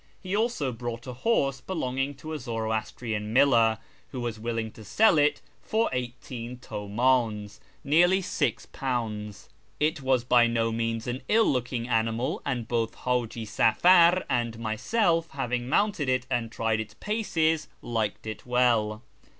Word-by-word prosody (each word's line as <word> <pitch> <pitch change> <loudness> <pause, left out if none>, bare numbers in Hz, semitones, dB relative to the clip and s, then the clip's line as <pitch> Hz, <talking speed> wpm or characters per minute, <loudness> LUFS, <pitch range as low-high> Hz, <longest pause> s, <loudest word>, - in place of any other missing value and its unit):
He 185 0 -3
also 220 - 0
brought 115 0 -6
a 125 - -6
horse 135 - 0
belonging 135 -4 -2
to 155 +4 -8
a 155 - -4
Zoroastrian 110 -2 -3
miller, 115 -4 +5 0.3
who 130 - -6
was 120 -2 -4
willing 115 -1 -3
to 110 - -13
sell 165 - +4
it 145 0 +2 0.2
for 225 +1 0
eighteen 125 -1 -5
Utmdns 110 -1 -1 0.2
(nearly 175 +6 +4
£6). 110 - -3 0.3
It 155 +1 +1
was 130 -2 +2
by 120 -1 +5
no 115 -1 0
means 115 0 -2
an 125 +1 -3
ill 225 +1 +4
looking 125 -2 -1
animal, 115 +1 0
and 125 -5 -2
both 115 -1 -1
Haji 120 -2 -2
Safar 170 - +5
and 120 -2 -1
myself, 165 - 0
having 125 -2 -2
mounted 200 -6 +1
it 130 0 +1
and 120 -3 -1
tried 115 -2 0
its 105 -1 -6
paces, 160 - 0 0.2
liked 110 -3 -2
it 110 -1 -6
well. 120 -3 +1
125 Hz, 140 wpm, -27 LUFS, 115-145 Hz, 0.3 s, miller